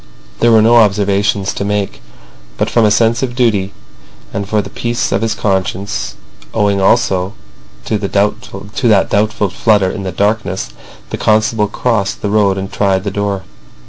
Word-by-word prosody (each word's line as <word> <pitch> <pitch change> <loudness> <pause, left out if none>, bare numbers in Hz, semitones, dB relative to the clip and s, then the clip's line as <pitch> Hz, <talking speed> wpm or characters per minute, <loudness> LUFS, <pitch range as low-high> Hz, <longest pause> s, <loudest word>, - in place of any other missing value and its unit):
There 120 - +4
were 110 -1 +6
no 120 +2 +5
observations 100 -2 +2
to - - -3
make; 100 -1 -2 0.6
but - - -1
from 115 -2 +3
a - - +4
sense 115 +2 +2
of 125 -2 -3
duty 105 -6 +1 0.6
and 100 0 -4
for 110 - +1
the 105 - -4
peace 120 0 -2
of - - +1
his 110 -1 0
conscience, 95 - -2 0.4
owing 100 -2 +2
also 95 0 +2 0.5
to 110 - -1
that 100 -1 -4 1.0
doubtful 105 -1 +1
flutter 100 -2 +2
of 100 - -5
the 95 - -3
darkness, 100 - -1 0.4
the - - -3
constable 110 0 +2
crossed 105 -2 -1
the 105 - -1
road, 100 -2 +2
and 95 +1 -5
tried 95 -2 +1
the 100 - -3
door. 100 -2 -2
105 Hz, 160 wpm, -15 LUFS, 95-110 Hz, 1.0 s, were